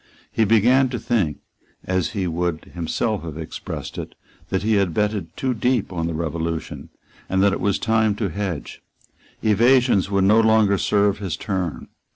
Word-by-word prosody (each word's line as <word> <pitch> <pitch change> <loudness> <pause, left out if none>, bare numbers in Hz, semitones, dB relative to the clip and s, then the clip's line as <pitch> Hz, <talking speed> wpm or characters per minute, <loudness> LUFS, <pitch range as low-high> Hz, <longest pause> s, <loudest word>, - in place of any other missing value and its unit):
He 110 - +2
began 120 +5 +4
to 125 - -3
think, 100 - -1 0.4
as 95 +1 -1
he 100 -4 -1
would 85 -1 -2
himself 90 +5 -1
have 80 -2 -7
expressed 80 -1 -6
it, - - -7 0.3
that 95 - -1
he 110 +1 +2
had 100 -5 +1
betted 105 -6 -1
too 130 -1 0
deep 120 -3 0
on 85 -2 -2
the 85 - -3
Revolution, 80 0 -4 0.4
and 95 +1 +2
that 100 -1 +4
it - - -3
was 100 0 +1
time 110 -2 +1
to 105 -2 -2
hedge. 95 -3 -5 0.6
Evasions 115 -1 +4
would 100 -1 +2
no 105 +3 +5
longer 110 -3 +3
serve 100 -1 +2
his 95 -5 -3
turn. 95 -6 -3
100 Hz, 170 wpm, -22 LUFS, 85-110 Hz, 0.6 s, no